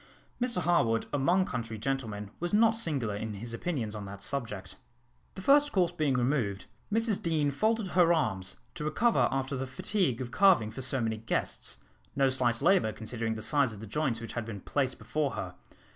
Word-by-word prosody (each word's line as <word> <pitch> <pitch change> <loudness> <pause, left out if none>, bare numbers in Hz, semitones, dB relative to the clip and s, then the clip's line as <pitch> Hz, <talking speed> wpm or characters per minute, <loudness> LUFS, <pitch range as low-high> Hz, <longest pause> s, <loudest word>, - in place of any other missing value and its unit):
Mr 240 -8 +1
Harwood 115 -10 +2
among 175 +7 +3
country 115 - -4
gentlemen 110 -4 -3
was 175 +2 -3
not 225 +1 +5
singular 140 - -1
in 110 0 -4
his 115 +4 -6
opinions 115 -5 -3
on 105 -2 -6
that 100 0 -8
subject. 105 -6 -3 0.6
The 190 - -7
first 290 +3 +5
course 180 -3 +2
being 155 -6 0
removed, 120 -6 0 0.3
Mrs 225 -1 +1
Deane 155 -4 +1
folded 215 +6 0
her 175 -1 +4
arms, 95 - 0 0.2
to 150 - -6
recover 215 +10 +2
after 135 +1 -1
the 135 0 -3
fatigue 135 - 0
of 125 -2 -5
carving 180 - +4
for 120 - -6
so 130 0 +2
many 110 -1 -1
guests; 110 +1 -2 0.4
no 135 -1 +3
slight 125 -1 +1
labour, 175 - +4
considering 110 0 -3
the 110 - -6
size 140 -6 +2
of 105 - -10
the 110 - -7
joints 125 0 -1
which 115 - -7
had 120 - -2
been 110 -3 -7
placed 130 +2 -1
before 150 -3 -2
her. - - -5
135 Hz, 190 wpm, -30 LUFS, 110-170 Hz, 0.6 s, not